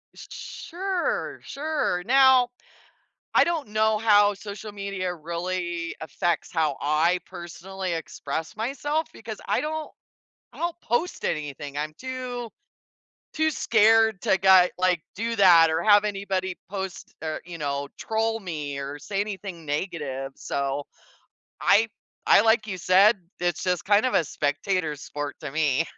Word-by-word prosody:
S - - -11
sure, 380 +7 -3
sure, 285 - -2
now, 260 -1 +6 0.8
I - - +6
don't 330 -7 -1
know 215 0 +2
how 205 -2 +5
social 205 +1 -8
media 200 -3 -3
really 170 +1 -3
affects 165 +3 -1
how 155 -5 0
I 160 +5 +2
personally 180 +1 -6
express 160 +2 -5
myself, 290 +7 -1
because 220 -2 -8
I - - +1
don't 310 0 -4 0.6
I - - -15
don't 345 0 -2
post 315 +10 -1
anything, 145 -1 -3
I'm 155 +1 -3
too 255 -2 -5 0.9
too 315 0 +2
scared 220 - +4
to 190 - +3
get 190 -1 +6
like, 180 -3 +2
do 230 +2 -2
that 170 -5 +7
or 160 +1 0
have 205 -1 +6
anybody 195 -2 -2 0.2
post 190 -2 -6
er, 155 -1 -3
you 170 -1 -8
know, 140 -1 -2
troll 225 0 0
me 150 -6 -5
or 140 +1 -5
say 195 +5 -3
anything 195 -5 -5
negative, 145 -4 -3
so, 140 +1 -2 0.8
I 220 +3 +5 0.4
I - - +7
like 220 -1 +3
you 190 -3 -4
said, 195 +5 +5 0.2
it's 175 -3 -1
just 180 -2 0
kind 205 +4 +4
of 255 - 0
a 170 - +4
spectator 155 +3 -1
sport 145 0 -6
to 145 -3 -5
me. 155 0 +1
190 Hz, 140 wpm, -25 LUFS, 160-220 Hz, 0.9 s, that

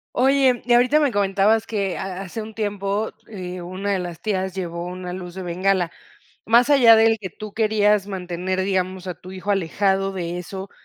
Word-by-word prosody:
Oye, 265 -2 +3
y 240 +1 +2
ahorita 255 +5 +5
me 285 -4 +2
comentabas 205 +2 +2
que 200 -5 -2
ha 190 0 -5
hace 195 +3 -6
un 220 - -10
tiempo, 205 0 -2 0.2
eh, 180 -4 -7
una 185 +3 -4
de - - +1
las 175 -2 -6
tías 190 -3 -1
llevó 170 -2 -4
una 180 0 -6
luz 180 -1 -7
de 190 - -6
bengala. 180 0 0 0.6
Más 235 +4 +4
allá 245 -6 +7
del 225 0 +4
que 190 -4 -6
tú 215 -1 -9
querías 210 -2 +2
mantener, 185 -1 -3
digamos, 185 -1 -1
a 180 - -4
tu 185 +3 -12
hijo 190 +2 -7
alejado 195 +1 +1
de 175 -2 -4
eso, 190 +2 -7
195 Hz, 190 wpm, -22 LUFS, 185-215 Hz, 0.6 s, allá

